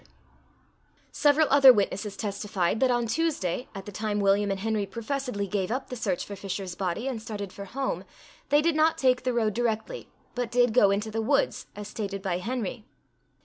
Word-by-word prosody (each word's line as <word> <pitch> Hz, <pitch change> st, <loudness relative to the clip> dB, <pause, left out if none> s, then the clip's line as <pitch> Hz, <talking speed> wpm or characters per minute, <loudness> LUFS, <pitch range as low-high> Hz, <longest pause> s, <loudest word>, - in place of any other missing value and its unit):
Several 295 Hz, +1 st, +4 dB
other 275 Hz, -1 st, +9 dB
witnesses 205 Hz, -2 st, -1 dB
testified, 200 Hz, -1 st, -1 dB
that 260 Hz, 0 st, +3 dB
on 240 Hz, -1 st, +1 dB
Tuesday, 250 Hz, -, -1 dB
at 195 Hz, -1 st, -7 dB
the 205 Hz, -, -7 dB
time 210 Hz, +1 st, -2 dB
William 200 Hz, +1 st, +3 dB
and 195 Hz, -1 st, -1 dB
Henry 215 Hz, -2 st, -1 dB
professedly 230 Hz, 0 st, -3 dB
gave 195 Hz, -1 st, -2 dB
up 260 Hz, +3 st, -3 dB
the -, -, -3 dB
search 195 Hz, -7 st, -2 dB
for 200 Hz, -, -7 dB
Fisher's 195 Hz, -1 st, -5 dB
body, 185 Hz, +6 st, -2 dB
and 245 Hz, -5 st, -3 dB
started 205 Hz, -3 st, -6 dB
for 200 Hz, -, -8 dB
home, 265 Hz, +7 st, -3 dB, 0.5 s
they 290 Hz, +1 st, +4 dB
did 335 Hz, 0 st, +3 dB
not 315 Hz, +1 st, +3 dB
take 255 Hz, -1 st, +3 dB
the 255 Hz, -, 0 dB
road 225 Hz, -3 st, +1 dB
directly, 235 Hz, -, -2 dB, 0.2 s
but 245 Hz, -2 st, -2 dB
did 245 Hz, -1 st, +3 dB
go 210 Hz, -5 st, +6 dB
into 205 Hz, +2 st, -1 dB
the 225 Hz, +1 st, -1 dB
woods, 230 Hz, -, +1 dB
as 205 Hz, 0 st, -7 dB
stated 200 Hz, -2 st, -5 dB
by 180 Hz, -3 st, -1 dB
Henry. 230 Hz, +1 st, -4 dB
220 Hz, 190 wpm, -27 LUFS, 200-250 Hz, 0.5 s, other